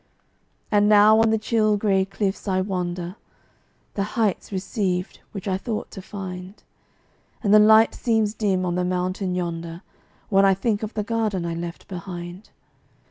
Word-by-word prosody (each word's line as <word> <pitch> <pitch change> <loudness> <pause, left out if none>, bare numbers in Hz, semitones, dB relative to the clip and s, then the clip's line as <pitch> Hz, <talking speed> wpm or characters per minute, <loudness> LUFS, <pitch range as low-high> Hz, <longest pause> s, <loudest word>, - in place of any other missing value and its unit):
And 205 0 +4
now 215 +1 +7
on 225 0 +4
the 220 - +2
chill 215 -1 +1
giay 195 -2 +1
cliffs 195 0 -3
I 190 -1 +1
wander, 180 -1 -3 0.8
The 200 - -1
heights 215 -3 0
recede 185 -1 -2
which 200 -2 -7
I 190 -1 0
thought 220 0 -4
to 190 - -8
find, 185 0 -8 0.8
And 205 -2 +3
the 215 - +9
light 220 +1 +6
seems 220 -3 0
dim 195 -4 0
on 175 - -1
the 180 +1 0
mountain 185 +1 -1
yonder, 170 0 -4 0.5
When 195 -1 +4
I 195 -1 +5
think 205 +1 -1
of 215 +1 -5
the 210 - -1
garden 215 -5 -1
I 170 - -2
left 170 +1 -6
behind. 175 +1 -8
195 Hz, 160 wpm, -23 LUFS, 180-215 Hz, 0.8 s, the